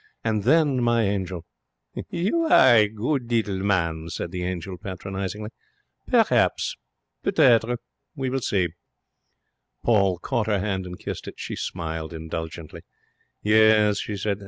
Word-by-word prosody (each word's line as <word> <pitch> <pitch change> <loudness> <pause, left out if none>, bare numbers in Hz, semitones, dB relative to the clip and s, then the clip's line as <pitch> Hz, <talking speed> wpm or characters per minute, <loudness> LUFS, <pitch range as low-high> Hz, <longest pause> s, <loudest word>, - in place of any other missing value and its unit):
And 110 -3 -1
then, 145 -2 +3
my 120 -1 +2
angel 95 -4 -2 0.3
' - - -10
'You 205 - 0
are 130 - +7
a 105 -2 +5
good 120 +3 -2
little 105 -5 0
man,' 85 -5 0
said 85 +1 -5
the 90 -1 -4
angel, 90 0 -4
patronizingly. 95 +1 -5 0.6
'Perhaps. - - +2 1.4
We 135 -3 -2
will 135 0 -1
see.' 95 -6 +1 1.1
Paul 100 -6 +3
caught 115 +4 -2
her 105 -2 +2
hand 95 -1 -2
and 90 0 -8
kissed - - -6
it. - - -7
She - - -5
smiled 80 -2 -4
indulgently. 80 0 -6 0.6
'Yes,' 105 -1 +5
she 105 - -4
said. 100 0 -2
100 Hz, 135 wpm, -24 LUFS, 90-115 Hz, 1.4 s, are